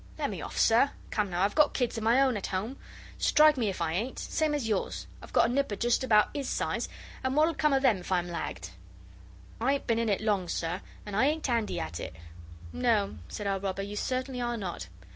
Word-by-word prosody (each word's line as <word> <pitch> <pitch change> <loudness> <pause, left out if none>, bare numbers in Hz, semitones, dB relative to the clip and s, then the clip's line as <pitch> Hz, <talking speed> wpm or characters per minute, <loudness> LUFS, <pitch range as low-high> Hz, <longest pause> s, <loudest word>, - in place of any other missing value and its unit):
Let - - -1
me - - -5
off, - - -7
sir. 235 +5 +5 0.2
Come 210 -2 0
now, 175 +1 0
I've 200 - +2
got 300 -1 +4
kids 245 -2 0
of 225 - -3
my 230 +4 +4
own 260 -3 +2
at 200 - -3
home, 215 +8 -3 0.4
strike 305 0 +6
me 235 -6 0
if 180 -3 -2
I 160 -1 -1
ain't 225 +9 -2
same 310 -2 0
as 270 -6 -2
yours 210 -4 -1 0.2
I've - - -12
got - - +4
a 240 - -2
nipper 275 -6 0
just 240 +5 +1
about 215 -4 +4
'is 280 -2 -3
size, - - -1 0.3
and 260 +1 0
what'll 310 +2 +4
come 300 0 +2
of 270 0 +2
them 240 -7 +5
if 180 - -9
I'm 175 -1 +1
lagged? 95 - -5 0.9
I 255 +5 +2
ain't 280 - -2
been 230 -1 +1
in 230 -1 0
it 200 - +2
long, 200 -5 0
sir, 175 +3 -2 0.2
and 205 -2 -5
I 255 +6 +4
ain't 310 +1 0
'andy 230 -4 0
at 80 +1 -4
it.' - - -6 0.6
'No,' 220 -5 +1
said 210 - -5
our 195 -1 0
robber; 195 0 -3
'you 205 +1 -6
certainly 255 +3 -2
are 240 0 -1
not. 175 - -5
225 Hz, 235 wpm, -29 LUFS, 195-260 Hz, 0.9 s, strike